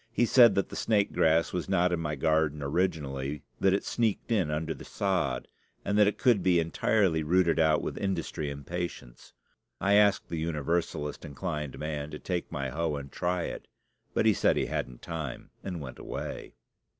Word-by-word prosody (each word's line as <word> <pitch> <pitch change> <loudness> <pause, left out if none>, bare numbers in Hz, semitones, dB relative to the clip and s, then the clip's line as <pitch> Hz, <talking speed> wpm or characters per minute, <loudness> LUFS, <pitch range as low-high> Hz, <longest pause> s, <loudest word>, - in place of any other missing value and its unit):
He 120 - +2
said 120 -1 +7
that 100 - 0
the - - -8
snake 105 -3 +1
grass 80 +1 +3
was 90 +1 -3
not 90 -2 +3
in 85 - 0
my 75 -2 -2
garden 75 0 +1
originally, 70 -3 -1 0.2
that 95 - +4
it 100 - 0
sneaked 115 0 -1
in 95 -9 +2
under 80 +1 -2
the - - -11
sod, 90 -11 -1 0.4
and 100 - 0
that 105 -1 +6
it 105 - 0
could 120 -7 +3
be 90 -1 +4
entirely 85 +1 +2
rooted 85 +2 +2
out 80 -1 +3
with - - -4
industry 85 -5 -2
and 70 0 -7
patience. 85 -8 -6 0.5
I 100 - +2
asked 105 -1 +4
the 85 - -3
Universalist 80 -1 -2
inclined 75 -1 -4
man 75 -1 -4
to 75 - -6
take 90 +2 -3
my 70 -1 -3
hoe 80 +2 -1
and 70 -1 -7
try 90 0 -1
it; - - -6 0.5
but - - +2
he - - +6
said - - +2
he - - +1
hadn't - - -4
time, 80 -6 -6
and 90 -3 -4
went 65 -3 -8
away. - - -6
80 Hz, 185 wpm, -29 LUFS, 75-95 Hz, 0.5 s, said